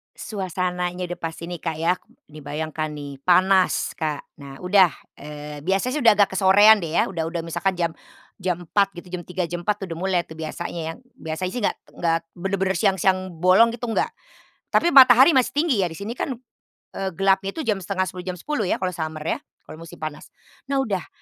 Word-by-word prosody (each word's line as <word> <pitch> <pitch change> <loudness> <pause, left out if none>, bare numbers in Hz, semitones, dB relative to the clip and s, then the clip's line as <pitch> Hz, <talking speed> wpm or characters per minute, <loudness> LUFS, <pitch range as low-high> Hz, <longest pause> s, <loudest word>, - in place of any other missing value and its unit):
Suasananya 180 -2 -3
udah 175 - -6
pasti 165 0 -5
nih 175 -2 -6
Kak 160 -2 -2
ya, 170 +3 +2 0.3
dibayangkan 155 +1 -5
nih, 145 -2 -7
panas, 185 +1 +3
Kak. 155 -3 -3 0.2
Nah, 135 -1 -10
udah. 185 -1 +4 0.2
Eee, 150 0 -9
biasanya 195 +8 0
sih 300 - -1
udah 225 - +8
agak 200 -1 +3
kesorean 205 +1 +6
deh 160 - -4
ya 170 - +2
udah 165 -4 -3
udah 170 - -3
misalkan 170 +3 -1
jam 170 -2 0 0.5
jam 180 -2 -1
4.00 200 +2 +2
gitu 175 - -9
jam 180 - -3
3.00 180 0 -3
jam 175 +1 -5
4.00 205 +1 -1
udah 165 - -5
mulai 185 +1 0
tuh 160 - -11
biasanya 165 +1 -5
ya, - - -8 0.2
biasanya 160 +4 -4
sih 245 - -4
nggak - - 0 0.2
nggak 165 -1 +1 0.2
benar-benar 190 +1 -1
siang-siang 190 -2 +1
bolong 185 +6 +5
gitu, 240 0 -5
nggak. 225 - 0 0.6
Tapi 345 - +2
matahari 265 +2 +8
masih 260 -4 +2
tinggi 295 -9 +2
ya 180 - +1
di 160 - -10
sini 205 +3 -5
kan, 255 0 -3 0.6
eee, 195 0 -3
gelapnya 195 0 +1
itu 320 - -3
jam 215 -6 0
9:30 185 -1 -3
jam 180 - -2
10.00 215 - -2
ya - - +2
kalau 185 -1 -2
summer 155 -2 -5
ya, - - -1 0.2
kalau 155 - -11
musim 165 0 -11
panas. 155 -1 -7 0.4
Nah 275 -1 +1
udah 195 -7 -3
180 Hz, 195 wpm, -23 LUFS, 165-195 Hz, 0.6 s, udah